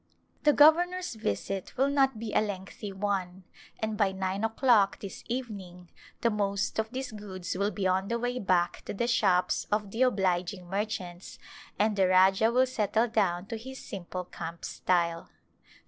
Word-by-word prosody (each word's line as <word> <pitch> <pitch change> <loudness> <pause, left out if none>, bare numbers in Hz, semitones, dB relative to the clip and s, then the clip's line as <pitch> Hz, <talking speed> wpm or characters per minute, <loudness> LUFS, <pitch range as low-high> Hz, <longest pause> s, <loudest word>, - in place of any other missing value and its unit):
The 295 - +5
governor's 350 +4 +4
visit 195 - -3
will 270 +2 +3
not 270 -4 +3
be 215 -1 -5
a - - +4
lengthy 200 0 -5
one 190 -2 -2 0.4
and 220 -1 -2
by 200 -2 +3
nine 190 +1 -2
o'clock 225 -3 +3
this 200 - -8
evening 200 -8 -6 0.3
the 235 - +2
most 200 0 -1
of 220 0 -1
these 260 +1 -5
goods 190 -5 -6
will 200 +2 +1
be 200 -2 -3
on 190 +1 +1
the 235 - 0
way 245 +1 -2
back 180 -4 +1
to - - -5
the 235 - 0
shops 195 -6 +2
of 210 -1 0
the 225 - -3
obliging 185 -5 +1
merchants, 190 -2 -4 0.4
and 210 0 +2
the 190 -2 +3
Rajah 190 +4 +5
will 255 +2 +4
settle 225 -2 +1
down 195 -5 +1
to 225 +2 -5
his 265 +4 -9
simple 185 -1 -5
camp 170 -1 -7
style. 170 -2 0
205 Hz, 165 wpm, -29 LUFS, 185-230 Hz, 0.4 s, The